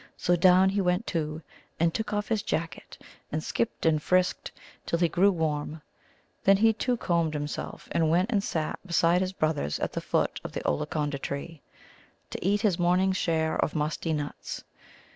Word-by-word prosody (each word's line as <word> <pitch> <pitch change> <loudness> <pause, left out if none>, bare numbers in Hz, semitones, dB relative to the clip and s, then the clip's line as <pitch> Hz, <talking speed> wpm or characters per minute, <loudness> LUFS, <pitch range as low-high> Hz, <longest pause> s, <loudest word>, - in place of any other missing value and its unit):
So 175 - +2
down 185 +2 +5
he 200 +1 0
went, 180 +4 +1
too, 155 -2 -3 0.4
and 165 0 +2
took 220 - -3
off 210 0 -2
his 220 -3 +1
jacket, 165 -3 -4 0.3
and 155 +1 -2
skipped 230 - -2
and 155 -2 +3
frisked 180 +3 +1 0.3
till 170 - -1
he 170 0 +3
grew 185 +4 +4
warm. 155 -2 -2 0.6
Then 195 0 +6
he, 225 +2 +4
too, 245 +3 -1
combed 170 -6 0
himself, 145 0 -5
and 160 -2 +2
went 180 +7 +2
and 205 -4 +1
sat 160 -6 -2
down - - -19
beside 170 +1 +3
his 185 0 -1
brothers 155 - 0
at - - -2
the - - -3
foot - - 0
of - - -7
the - - -4
Ollaconda 145 - -1
tree 140 +3 -5 0.7
to - - -5
eat 200 +3 +2
his 200 -6 +1
morning's 185 +2 +2
share 160 -3 0
of - - -2
musty 155 +2 -1
nuts. 145 -2 -4
170 Hz, 180 wpm, -27 LUFS, 155-190 Hz, 0.7 s, Then